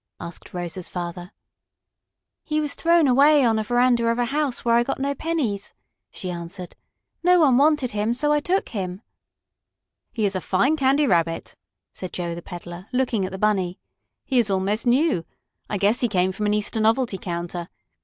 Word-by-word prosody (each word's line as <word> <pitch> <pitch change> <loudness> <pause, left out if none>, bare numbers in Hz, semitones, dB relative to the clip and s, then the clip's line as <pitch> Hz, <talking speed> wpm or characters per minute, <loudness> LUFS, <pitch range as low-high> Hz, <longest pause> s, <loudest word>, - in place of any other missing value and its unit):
asked 170 - -9
Rosa's 175 0 -5
father. 175 +1 -6 1.1
"He 305 -1 -1
was 295 -2 -1
thrown 335 -2 +3
away 280 +2 +5
on 225 -2 +2
a - - -1
veranda 240 +1 +2
of 230 0 +1
a 245 - +1
house 280 -1 -2
where 235 - +3
I 235 - +5
got 240 - -2
no 280 +1 -1
pennies," 275 -10 -2 0.3
she 185 - -6
answered. 175 +1 -7 0.5
"No 360 0 +5
one 275 -5 +5
wanted 290 -3 +3
him, 210 +3 0
so 295 +4 +1
I 295 - +3
took 370 +6 -1
him." 190 -1 -5 1.1
"He 220 -3 -1
is 195 -1 0
a 185 - -1
fine 200 - +2
Candy 280 0 +3
Rabbit," 165 -7 0 0.4
said 185 - -7
Joe, 170 -1 -3
the 170 - -7
peddler, 175 +2 -9
looking 250 -6 0
at 185 - -5
the 190 - -5
Bunny. 190 -3 0 0.5
"He 260 -3 +2
is 225 -3 +1
almost 195 +5 0
new. 260 - +3 0.5
I 205 - -1
guess 205 +5 +2
he 245 - +3
came 190 -3 +1
from 210 +2 -2
an 210 - +2
Easter 210 +1 -1
novelty 225 -2 +1
counter. 175 0 -5
220 Hz, 185 wpm, -23 LUFS, 185-270 Hz, 1.1 s, away